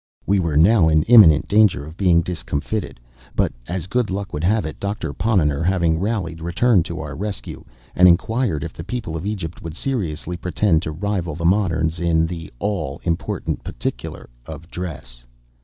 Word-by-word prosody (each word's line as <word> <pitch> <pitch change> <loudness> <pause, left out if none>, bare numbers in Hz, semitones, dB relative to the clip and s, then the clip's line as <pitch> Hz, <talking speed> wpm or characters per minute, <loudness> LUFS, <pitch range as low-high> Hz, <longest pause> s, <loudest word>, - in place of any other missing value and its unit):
We 100 0 +2
were 80 -5 0
now 85 0 +5
in 80 -1 +3
imminent 100 -10 +7
danger 105 -8 +3
of 80 +2 -11
being 85 -3 +3
discomfited; 80 - -4 0.4
but, - - +1
as 90 -1 -3
good 120 +4 0
luck 95 +1 -4
would 75 - -3
have 105 +4 +2
it, 80 - -6
Doctor 100 -7 -3
Ponnonner, 80 -6 +1
having 85 -2 +1
rallied, 95 -5 -2
returned 90 +2 +2
to 85 -2 -5
our 75 -1 -6
rescue, 100 +5 -5 0.3
and 90 - +7
inquired 100 - +2
if 85 - -6
the 80 - -8
people 100 -5 -4
of 80 +5 -4
Egypt 90 -6 -5
would 80 -1 -7
seriously 90 - -3
pretend 85 0 +1
to 80 - -4
rival 90 -1 -2
the 85 +1 -4
moderns 85 -4 +1
in 80 -2 +2
the 80 -1 -6
all 75 -6 -3
important 85 -2 -2
particular - - -5 0.2
of 80 +2 -9
dress. 65 -9 -7
85 Hz, 175 wpm, -21 LUFS, 80-100 Hz, 0.4 s, imminent